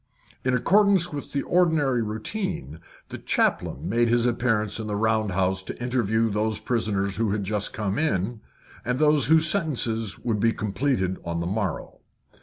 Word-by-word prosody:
In 130 0 +1
accordance 190 - +3
with 145 - -6
the 140 - -1
ordinary 160 -8 +2
routine, 110 - -4 0.3
the - - -7
chaplain - - 0
made 120 +2 +2
his 120 0 +3
appearance 115 -3 0
in 110 - -4
the 105 - -2
round 110 0 +1
house 95 0 0
to - - -7
interview 115 -3 0
those 105 +1 0
prisoners 100 -5 -1
who 115 -1 +1
had 105 -1 -1
just 105 +1 -2
come 105 +2 -2
in, 110 - -1 0.4
and 125 +1 -1
those 150 0 +3
whose 160 +2 +5
sentences 120 - -1
would 110 -3 -2
be 115 +2 +2
completed 100 -3 -1
on 85 0 -3
the 85 - -2
morrow. 95 -1 -3
115 Hz, 165 wpm, -25 LUFS, 105-135 Hz, 0.4 s, whose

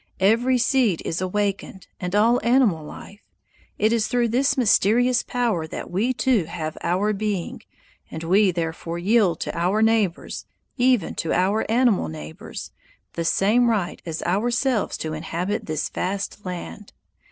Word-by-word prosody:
Every 230 +6 +3
seed 240 -7 +2
is 165 - -2
awakened, 195 0 -2
and 180 +2 -3
all 230 +4 +4
animal 235 - +3
life. 200 +7 -11 0.6
It 215 +2 +2
is 225 -2 +1
through 245 -2 +1
this 275 +5 +1
mysterious 245 +1 +3
power 225 -10 -1
that - - -7
we 210 +8 +1
too 250 -7 +1
have 155 -1 -5
our 190 +5 +1
being, 205 -3 -3 0.5
and 160 - -7
we 190 +4 +4
therefore 165 -1 -3
yield 200 0 +2
to - - -4
our 185 +6 +1
neighbors, 220 -6 0 0.3
even 250 -7 +2
to 165 - -2
our 195 +5 +1
animal 230 - +2
neighbors, 80 0 -8 0.4
the 170 - -3
same 220 +8 +3
right 200 -6 -1
as 165 -2 -5
ourselves 235 +5 0
to 155 -1 -4
inhabit 170 +6 -3
this 155 -1 -2
vast 195 +1 -4
land. 180 +3 -7
205 Hz, 145 wpm, -23 LUFS, 175-235 Hz, 0.6 s, all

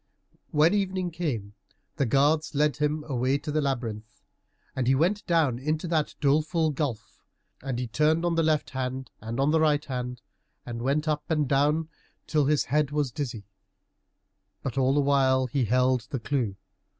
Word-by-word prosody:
When 155 +4 +4
evening 190 -3 -1
came 130 - -3 0.4
the 140 - +1
guards 145 +5 +2
led 150 +1 +2
him 150 +1 0
away 130 -2 0
to 150 +1 -5
the 155 +1 +1
labyrinth. 115 -6 -4 0.5
And 130 -2 -1
he 135 - +4
went 180 +9 +1
down 155 -8 +2
into 155 +5 -2
that 155 -3 0
doleful 155 +3 +2
gulf, 130 -6 -4 0.4
and 135 -2 -3
he 125 - -2
turned 155 +7 +1
on 175 - +1
the 165 - +2
left 155 -2 +1
hand 130 -1 -4
and 115 +3 -5
on 140 +2 +3
the 160 - +3
right 150 -1 +2
hand, 125 -2 -5 0.4
and 115 -1 -5
went 140 +5 0
up 150 -1 -1
and 150 -3 +1
down 150 +4 +2 0.4
till 150 -2 +1
his 150 +1 +2
head 150 0 +1
was 145 -3 -1
dizzy, 120 -6 -5 1.2
but 135 - -3
all 135 0 +2
the 145 - +4
while 135 -2 +3
he 130 0 0
held 125 +2 +2
the 135 - -3
clue. 115 -5 -1
140 Hz, 175 wpm, -27 LUFS, 125-155 Hz, 1.2 s, When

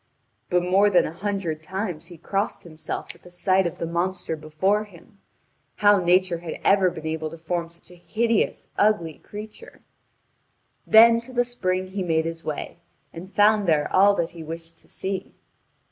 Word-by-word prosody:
But 180 0 +2
more 195 +3 +4
than 185 - +4
a 155 - -5
hundred 185 -4 -3
times 185 -1 -5
he 175 - -11
crossed 195 +5 -2
himself 155 -2 -6
at 180 - -17
sight 185 +1 +2
of 170 - -7
the - - -3
monster 170 0 -2
before 175 +8 0
him 200 +1 -18 0.6
how 205 -1 +5
Nature 180 0 +3
had 170 -1 -7
ever 195 -2 +4
been 160 -2 -9
able 160 0 -3
to 165 - -10
form 170 +1 -3
such 170 +1 -17
a 175 -1 -17
hideous, 230 0 0
ugly 185 -7 +1
creature. 215 - -11 1.0
Then 230 +1 +7
to 245 +2 -12
the 245 -1 +2
spring 185 -6 -2
he 195 +1 -4
made 160 -3 +1
his 165 0 -5
way, 155 +2 -5 0.3
and 180 +3 -9
found 210 -1 +3
there 150 -3 +1
all 200 +2 +6
that 170 -3 -1
he 170 - -10
wished 165 +1 -8
to - - -20
see. 190 -1 -5
180 Hz, 175 wpm, -24 LUFS, 165-205 Hz, 1.0 s, Then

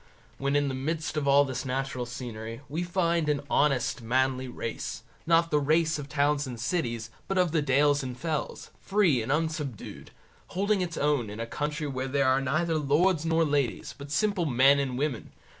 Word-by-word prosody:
When 140 +1 0
in 145 0 +2
the 135 - -2
midst 155 +5 -3
of 150 -2 -1
all 140 +1 +6
this 130 -2 -4
natural 130 -1 -3
scenery, 115 -1 -7
we 155 +5 -3
find 170 -3 0
an 145 -1 +1
honest 135 -4 +2
manly 130 +2 0
race, 115 -2 -5 0.2
not 165 0 +3
the 150 - +3
race 155 +2 +2
of 145 -1 -7
the - - -12
towns 145 0 +2
and 120 -3 -7
cities, 115 -5 -2 0.2
but 195 - -1
of 180 -3 +3
the 160 -1 +2
dales 145 +1 +3
and 125 -2 -6
fells, 160 -1 -4
free 190 - +2
and 110 - -3
unsubdued, 150 -6 -3 0.4
holding 200 +1 0
its 170 -2 -3
own 145 -7 +1
in 105 +2 -7
a 115 - -2
country 150 +5 -3
where 135 -2 -3
there 140 +1 +1
are 130 +1 +3
neither 155 +4 0
lords 160 +3 +2
nor 165 0 +3
ladies, 145 -5 -1
but 140 0 -10
simple 180 +3 +1
men 135 +2 +5
and 130 -3 -2
women. 140 -4 -3
145 Hz, 190 wpm, -28 LUFS, 130-160 Hz, 0.4 s, all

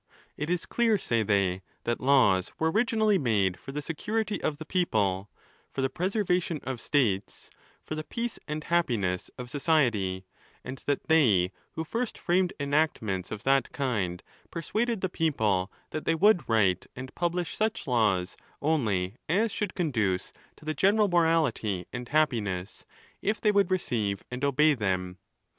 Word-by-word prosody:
It 150 +2 -4
is 175 -1 0
clear, 230 -3 +2
say 115 - 0
they, 100 -3 +1 0.2
that 120 0 -1
laws 125 -9 +4
were 160 0 +1
originally 220 -2 +2
made 100 -8 +1
for 135 - -8
the 150 +1 -4
security 210 +7 -2
of 145 - -1
the 160 - -8
people, 105 - 0 0.4
for 135 - -2
the 135 - 0
preservation 180 -3 0
of 130 -3 -4
states, 110 -9 0 0.3
for - - -6
the 155 0 -3
peace 235 +7 -4
and 150 0 -3
happiness 115 - 0
of 125 - -6
society; 120 - +1 0.4
and 130 +1 -7
that 145 - -1
they 110 - +4 0.2
who 160 - -3
first 230 +8 -3
framed 180 +1 +1
enactments 140 - 0
of 105 - -6
that 135 0 +2
kind, 100 -10 -1 0.3
per 170 - -5
suaded 230 +3 -1
the 190 - +1
people 110 - 0 0.2
that 155 - -4
they 165 - +2
would 180 - +4
write 100 -5 +2
and 130 +1 -8
publish 175 0 -1
such 220 -3 -1
laws 105 - +1 0.2
only 110 -10 0
as 210 +6 +2
should 210 -2 -3
conduce 115 - 0 0.2
to - - -17
the 155 - -1
general 205 +4 +3
morality 155 - +1
and 125 -1 -5
hap 155 +1 +4
piness, 95 -6 -4 0.4
if 215 +2 0
they 210 - +3
would 200 -2 +3
receive 110 - -1
and 125 +2 -5
obey 150 +2 +4
them. 95 -6 -2
140 Hz, 160 wpm, -28 LUFS, 105-175 Hz, 0.4 s, laws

